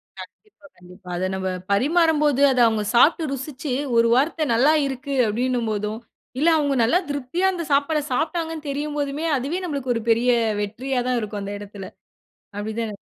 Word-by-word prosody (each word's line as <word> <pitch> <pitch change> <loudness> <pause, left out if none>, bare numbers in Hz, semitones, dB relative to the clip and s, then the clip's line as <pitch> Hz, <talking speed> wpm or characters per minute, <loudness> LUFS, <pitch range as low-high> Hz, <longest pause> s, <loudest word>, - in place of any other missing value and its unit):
க - - -13 0.2
கண்டிப்பா 425 -8 -26
கண்டிப்பா. 180 +2 -16
அத 185 - -1
நம்ம 190 0 -2 0.2
பரிமாறம் 310 +8 +3
போது 285 -2 +2
அத 255 - 0
அவுங்க 220 -2 0
சாப்ட்டு 315 +6 +4
ருசிச்சு 275 +1 -5 0.3
ஒரு 230 0 +5
வார்த்தை 310 +4 +1
நல்லா 265 +7 +4
இருக்கு 275 +1 -4
அப்படின்னு 245 +4 0
போதும், 210 +1 -3 0.4
இல்ல 310 - +2
அவுங்க 285 -2 0
நல்லா 325 +11 +3
திருப்தியா 285 +6 -2
அந்த 345 -2 -4
சாப்பாடு 290 +2 +2
சாப்பிட்டாங்கணு 325 +1 -2
தெரியும் 295 +1 -3
போதுமே, 285 +3 -2
அதுவே 280 +8 -3
நம்மளுக்கு 280 -6 -2
ஒரு 230 - -3
பெரிய 230 +2 +3 0.3
வெற்றியா 245 +5 -2
தான் 250 -1 +1
இருக்கும் 210 -1 -5
அந்த 200 +1 -5
இடத்தில, 200 -1 -9 0.7
அப்படித்தானே? 220 +1 -4
265 Hz, 165 wpm, -22 LUFS, 220-300 Hz, 0.7 s, ஒரு